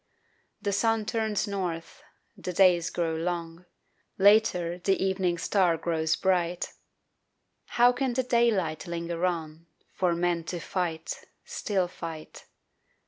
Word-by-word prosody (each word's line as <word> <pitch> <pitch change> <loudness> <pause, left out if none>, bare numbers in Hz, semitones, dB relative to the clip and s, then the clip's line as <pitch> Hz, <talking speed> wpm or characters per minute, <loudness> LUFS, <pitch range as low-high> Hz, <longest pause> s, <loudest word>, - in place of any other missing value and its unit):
The 200 -2 0
sun 225 +1 +1
turns 220 -1 -1
north, 180 -5 -4 0.3
the 180 - -5
days 175 -2 +4
grow 165 -2 -1
long, 170 +1 -4 0.5
Later 190 -4 +4
the 190 +2 +1
evening 190 -2 0
star 175 -1 +2
grows 160 -1 0
bright 180 -2 0 1.0
How 240 +1 +7
can 250 0 -1
the 260 +2 +1
daylight 210 -10 +1
linger 170 0 -4
on 165 -1 -4 0.3
For 180 -2 +1
men 170 -1 0
to 175 +1 -4
fight, 165 -2 -3 0.2
Still 190 -4 -1
fight? 165 -3 -8
180 Hz, 120 wpm, -28 LUFS, 170-200 Hz, 1.0 s, How